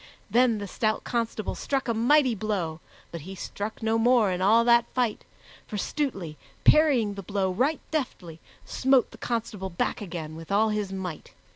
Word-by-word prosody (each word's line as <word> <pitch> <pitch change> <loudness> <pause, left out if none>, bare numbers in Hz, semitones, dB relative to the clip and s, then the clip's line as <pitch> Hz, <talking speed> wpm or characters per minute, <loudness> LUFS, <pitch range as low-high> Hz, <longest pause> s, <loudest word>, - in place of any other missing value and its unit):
Then 240 0 +4
the 205 - -5
stout 215 +3 -1
constable 230 -3 -2
struck 275 -2 -2
a 230 - +1
mighty 255 +3 +4
blow; 190 -7 -2 0.3
but 170 - -6
he 190 +6 -8
struck 205 +4 -6
no 225 +1 +2
more 235 -3 +4
in 180 0 -2
all 220 +5 +5
that 235 0 +5
fight, 245 -4 0 0.4
for 210 - -5
Stutely, 195 - -3 0.3
parrying 270 -9 +4
the 200 - -7
blow 195 0 -1
right 265 +11 0
deftly, 185 - -4 0.3
smote 265 -1 +2
the - - -14
constable 220 -5 -3
back 170 - -2
again 165 -5 -6
with 165 +3 -10
all 215 +2 +3
his 210 -2 -2
might. 185 -5 -6
215 Hz, 170 wpm, -26 LUFS, 190-240 Hz, 0.4 s, all